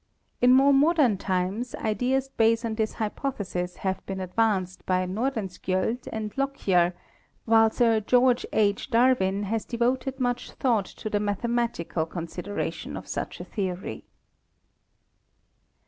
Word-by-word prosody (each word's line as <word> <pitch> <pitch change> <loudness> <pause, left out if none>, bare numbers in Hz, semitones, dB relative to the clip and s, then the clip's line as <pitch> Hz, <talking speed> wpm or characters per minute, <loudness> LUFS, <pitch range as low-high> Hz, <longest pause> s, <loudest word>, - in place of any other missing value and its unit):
In 245 +1 +6
more 275 +2 +6
modern 275 - +4
times 190 +6 -2
ideas 250 +5 0
based 230 -2 +2
on 225 - -2
this 220 -1 -1
hypothesis 205 -6 -3
have 190 0 -1
been 195 -1 -4
advanced 190 -1 0
by 185 0 +2
Nordenskiold 205 0 -2
and 215 -1 -4
Lockyer, 190 -11 +1 0.5
while 225 -1 +5
Sir 230 -1 +3
George 245 +3 +3
H. 205 +1 +1
Dar 250 +2 +5
win 190 +2 0
has 220 +2 -1
devoted 255 +3 -1
much 245 -1 -2
thought 230 -7 +1
to - - -8
the 210 -1 0
mathematical 205 -5 -1
con 170 0 -5
sideration 180 +5 -5
of - - -9
such - - -4
a - - -6
theory. 190 -3 -4
220 Hz, 130 wpm, -26 LUFS, 190-245 Hz, 0.5 s, In